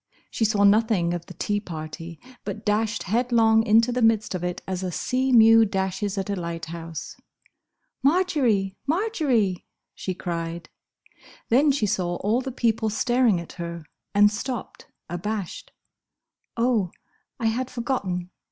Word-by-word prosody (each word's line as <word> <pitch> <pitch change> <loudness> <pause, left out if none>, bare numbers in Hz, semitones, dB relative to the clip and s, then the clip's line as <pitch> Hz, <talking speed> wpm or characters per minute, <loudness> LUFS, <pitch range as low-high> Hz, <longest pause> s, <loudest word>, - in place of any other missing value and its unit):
She 225 - 0
saw 210 -2 +2
nothing 205 -4 +3
of 175 -1 -5
the - - -11
tea 205 0 -1
party, 165 -2 -8 0.2
but 215 - -6
dashed 215 +1 0
headlong 225 +1 +3
into 225 +3 +4
the 250 +1 -1
midst 225 -3 +3
of 180 -1 -3
it 180 0 -3
as 185 -1 -3
a 185 -1 -3
sea 260 +9 0
mew 225 -1 +7
dashes 195 0 -2
at 195 - -2
a - - 0
lighthouse. 165 -2 -6 0.9
"Marjory! 265 - +2
Marjory!" 285 - 0 0.3
she 185 - -4
cried. 170 -1 -4 0.8
Then 275 +6 +4
she 265 -6 0
saw 180 -4 -1
all 215 +7 0
the 265 - -5
people 225 -3 +1
staring 240 -2 +2
at 170 - -8
her, 170 -1 -6 0.3
and 205 0 +6
stopped, 235 +2 -5 0.2
abashed. 190 +2 -4 0.9
"Oh! 230 -6 +2 0.5
I 230 - -2
had 240 +3 0
forgotten!" 200 -8 -3
210 Hz, 140 wpm, -25 LUFS, 180-235 Hz, 0.9 s, mew